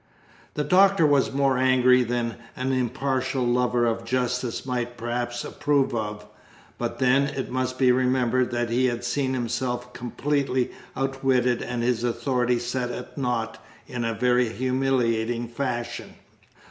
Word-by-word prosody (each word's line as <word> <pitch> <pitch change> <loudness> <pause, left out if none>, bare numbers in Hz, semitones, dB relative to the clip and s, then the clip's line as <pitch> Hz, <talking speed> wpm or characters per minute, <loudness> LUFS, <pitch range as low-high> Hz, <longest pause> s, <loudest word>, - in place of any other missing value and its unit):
The 150 - 0
Doctor 190 0 +5
was 145 -3 +3
more 135 -2 +2
angry 130 -1 +5
than 120 -1 -2 0.2
an 130 +1 -1
impartial 130 +1 -1
lover 120 0 +2
of 115 0 -1
justice 125 0 -1
might 120 -2 -3
perhaps 120 +1 -3
approve 145 -3 +1
of, 105 -2 -3 0.5
but - - -3
then 135 +2 +3
it 140 -3 -4
must 130 0 -2
be 130 -1 +4
remembered 125 -1 +2
that 120 -1 -2
he 130 +2 +3
had 120 -1 -2
seen 130 +2 -1
himself 125 0 -3
completely 130 +1 -1 0.3
outwitted 135 -2 +1
and 120 -1 -3
his 120 -1 0
authority 120 +1 +1
set 125 +1 -2
at - - -7
nought 120 -5 -2 0.2
in 120 -1 -4
a 115 -1 -1
very 125 0 +2
humiliating 120 -2 0
fashion. 120 -1 -4
125 Hz, 140 wpm, -25 LUFS, 120-130 Hz, 0.5 s, Doctor